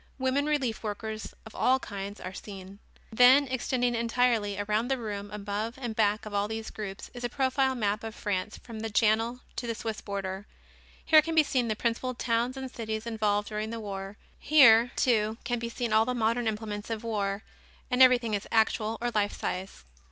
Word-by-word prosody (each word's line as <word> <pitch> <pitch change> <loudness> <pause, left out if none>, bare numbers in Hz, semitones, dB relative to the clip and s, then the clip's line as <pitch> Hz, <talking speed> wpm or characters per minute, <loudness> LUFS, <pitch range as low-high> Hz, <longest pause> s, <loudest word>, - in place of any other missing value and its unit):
Women 270 +2 +1
relief 270 -7 0
workers 215 0 -5
of 220 - -11
all 260 +1 +3
kinds 200 -4 -7
are 185 - -7
seen. 195 0 -9 0.3
Then 255 +5 +6
extending 245 -1 0
entirely 230 -3 +1
around 210 +3 0
the 270 0 0
room 205 -3 -5
above 210 +3 -4
and 240 -4 -4
back 210 0 +1
of 215 - -7
all 200 0 +1
these 220 0 -5
groups 200 -2 -7
is 245 -1 -8
a 240 - -1
profile 265 0 +1
map 210 -2 -1
of 225 -1 -6
France 205 +1 -3
from 225 -2 -9
the 225 0 -3
Channel 225 +3 +2 0.2
to 240 - -3
the 230 - -2
Swiss 220 -1 -4
border. 195 0 -5 0.6
Here 310 -1 +7
can 325 +1 -3
be 315 - +7
seen 255 -4 0
the 215 - 0
principal 240 +3 -1
towns 240 +2 0
and 265 -1 -5
cities 220 -2 -4
involved 210 -3 0
during 215 0 -3
the 230 0 -5
war. 195 -1 -6 0.2
Here, 245 -6 +7
too, 220 -3 +2
can 240 -1 -1
be 235 0 -4
seen 235 -1 -3
all 220 +1 +5
the 250 +1 -1
modern 230 +1 +1
implements 210 -1 -4
of 225 -1 -3
war 205 -3 -2 0.5
and 250 +1 +2
everything 245 -3 +6
is 205 -1 -2
actual 220 0 +2
or 240 0 0
life 205 -2 0
size. 185 - -4
225 Hz, 195 wpm, -28 LUFS, 210-245 Hz, 0.6 s, Here